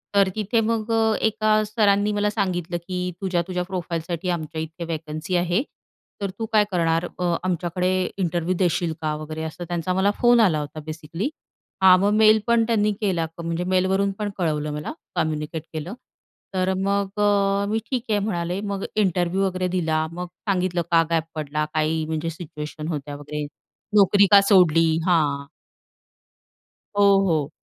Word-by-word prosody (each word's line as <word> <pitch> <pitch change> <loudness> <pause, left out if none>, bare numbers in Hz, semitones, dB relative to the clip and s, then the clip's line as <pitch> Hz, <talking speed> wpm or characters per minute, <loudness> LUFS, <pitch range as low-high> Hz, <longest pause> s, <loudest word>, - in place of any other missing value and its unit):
तर 195 -1 +5
तिथे 215 +2 0
मग 225 0 -1
अ, 225 -1 +3
एका 215 0 +2
सरांनी 210 -1 +2
मला 205 0 +1
सांगितलं 175 -3 -2
की 180 -1 -2
तुझ्या-तुझ्या 180 -1 -1
प्रोफाईलसाठी 175 -1 -4
आमच्या 160 -2 -3
इथे 160 +2 -6
वॅकन्सी 155 +3 -4
आहे. 175 +6 +1 0.6
तर 200 - -1
तू 225 - -1
काय 215 - +6
करणार 165 -1 +1
अ, 175 -1 +1
आमच्याकडे 180 0 -1 0.3
इंटरव्ह्यू 175 0 0
देशील 175 -2 +1
का 155 -1 -1
वगैरे 155 +1 -6
असं 160 +2 -6
त्यांचा 175 +1 -2
मला 190 +2 +2
फोन 240 0 +6
आला 180 -9 +4
होता 150 +1 -6
बेसिकली. 160 - -4 0.5
हा 185 -1 +9
मग 200 +2 +2
मेल 215 0 +6
पण 235 -1 +4
त्यांनी 210 -2 +2
केला 180 -5 +1 0.2
म्हणजे 170 +1 -2
मेलवरून 185 +2 +1
पण 210 -1 -1
कळवलं 150 -4 -1
मला 150 +1 -4 0.2
कम्युनिकेट 155 0 -2
केलं. 160 +6 -5 0.6
तर 185 0 +1
मग 200 +1 -1
अ, 200 -1 +2
मी 220 +1 +1
ठीक 250 -3 0
आहे 210 - +2
म्हणाले 180 -3 -2
मग 195 0 -3
इंटरव्ह्यू 185 -2 +1
वगैरे 185 -1 -1
दिला 160 -2 +1
मग 180 +1 -5 0.2
सांगितलं 180 -2 +1
का 165 -1 +5
गॅप 165 -1 +2
पडला? 150 0 -2
काही 155 0 0
म्हणजे 160 +1 -2
सिच्युएशन 155 -2 -7
होत्या 145 -3 -4
वगैरे 150 +1 -5 0.5
नोकरी 200 0 +6
का 200 -1 +9
सोडली? 165 -5 +5 0.2
हां. 145 -5 +1 1.5
हो, 205 - +4 0.2
हो. 155 -4 +1
180 Hz, 155 wpm, -23 LUFS, 160-200 Hz, 1.5 s, हा